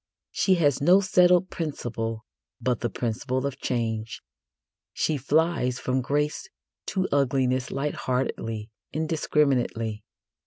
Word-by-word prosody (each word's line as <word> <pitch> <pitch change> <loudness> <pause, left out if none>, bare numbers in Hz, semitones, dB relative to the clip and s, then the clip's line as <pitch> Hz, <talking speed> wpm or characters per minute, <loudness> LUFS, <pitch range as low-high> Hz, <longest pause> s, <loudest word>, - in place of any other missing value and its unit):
She 190 - +3
has 145 -6 +2
no 180 +6 +6
settled 180 -1 +4
principle 115 -8 -4 0.3
but 125 -1 0
the 120 - -1
principle 125 +4 -2
of 140 -1 -3
change. 115 -2 -2 0.7
She 155 - 0
flies 145 -2 +1
from 130 0 0
grace 150 - -1 0.4
to 190 -1 0
ugliness 130 -2 +1
lightheartedly, 125 -5 -2 0.2
indiscriminately. 135 -8 0
130 Hz, 105 wpm, -26 LUFS, 120-155 Hz, 0.7 s, no